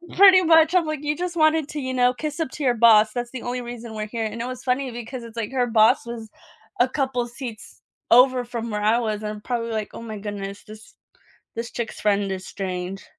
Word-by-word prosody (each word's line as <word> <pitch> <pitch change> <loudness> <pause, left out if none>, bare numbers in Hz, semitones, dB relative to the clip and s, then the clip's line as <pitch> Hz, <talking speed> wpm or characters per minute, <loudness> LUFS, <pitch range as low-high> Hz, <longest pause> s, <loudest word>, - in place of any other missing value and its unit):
Pretty 380 -1 +8
much, 325 -1 +5
I'm 355 -3 +3
like, 305 -1 -4
"You 300 0 0
just 355 +1 -4
wanted 310 -2 +3
to, 300 - -5
you 260 -1 -3
know, 250 0 +3
kiss 300 +4 -5
up 320 - -1
to 300 - -6
your 250 -2 +3
boss, 220 -2 +6
that's 240 -1 -4
the 255 -3 -7
only 245 +1 -3
reason 240 -2 -8
we're 215 0 -4
here," 225 0 -3
and 225 +2 -5
it 240 - -3
was 255 0 -7
funny 255 0 -1
because 240 +1 -7
it's, 230 0 -12
like, 225 +2 -3
her 250 -2 +1
boss 225 +4 +4
was 230 -2 -7 0.5
a 245 - +5
couple 265 -3 -1
of 240 - -5
seats 235 -3 -9 0.3
over 250 +1 +6
from 235 -1 -5
where 210 0 -2
I 215 +2 +3
was 215 -2 -2
and 210 - -4
I'm 210 0 -7
probably 230 0 -3
like, 215 -1 -3
"Oh - - -8
my 220 -2 -7
goodness, 200 -1 -6
this 215 +1 -14 0.6
this 230 +1 -4
chick's 235 -2 -5
friend 200 -2 +1
is 190 0 -5
strange." 185 0 -5
240 Hz, 240 wpm, -23 LUFS, 215-260 Hz, 0.6 s, Pretty